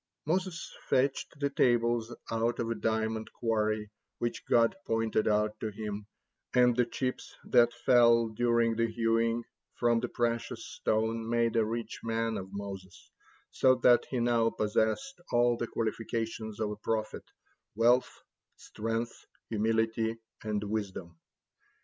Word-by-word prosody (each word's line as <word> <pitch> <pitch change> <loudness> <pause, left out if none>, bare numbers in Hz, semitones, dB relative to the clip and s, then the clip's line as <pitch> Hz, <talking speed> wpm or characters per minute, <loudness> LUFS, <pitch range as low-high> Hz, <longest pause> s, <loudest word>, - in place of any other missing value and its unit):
Moses 180 +1 -2
fetched 135 +2 0
the 140 -1 0
tables 120 -2 +2 0.2
out 115 +1 0
of 115 0 -2
a - - +2
diamond 110 0 -1
quarry 110 -2 -1 0.3
which 120 - -3
God 115 -1 +4
pointed 115 -1 +1
out 105 0 +1
to 110 - -2
him, 105 -1 -6 0.5
and 125 -1 +5
the 125 -1 +2
chips 130 -1 -4
that 120 -1 +4
fell, 115 -2 +4
during 115 0 +2
the 115 +1 +1
hewing, 115 0 +1 0.3
from 120 -1 +2
the - - -2
precious 115 -1 -2
stone 110 +1 -1
made 115 -1 +1
a 115 - +4
rich 115 +2 -4
man 115 0 -1
of 95 0 -8
Moses, 100 -2 -8 0.4
so 130 -1 +4
that 125 -1 +4
he 130 - -1
now 120 -1 +3
possessed 110 - -1
all 120 0 +4
the 120 - -3
qualifications 115 -1 -3
of 105 -1 -1
a 105 - -6
prophet 110 0 -3 0.5
wealth, 120 +3 +4 0.5
strength, 115 +2 -4 0.2
humility, 110 +1 +1 0.3
and 105 -1 -2
wisdom. 95 -5 -4
115 Hz, 135 wpm, -30 LUFS, 110-120 Hz, 0.5 s, and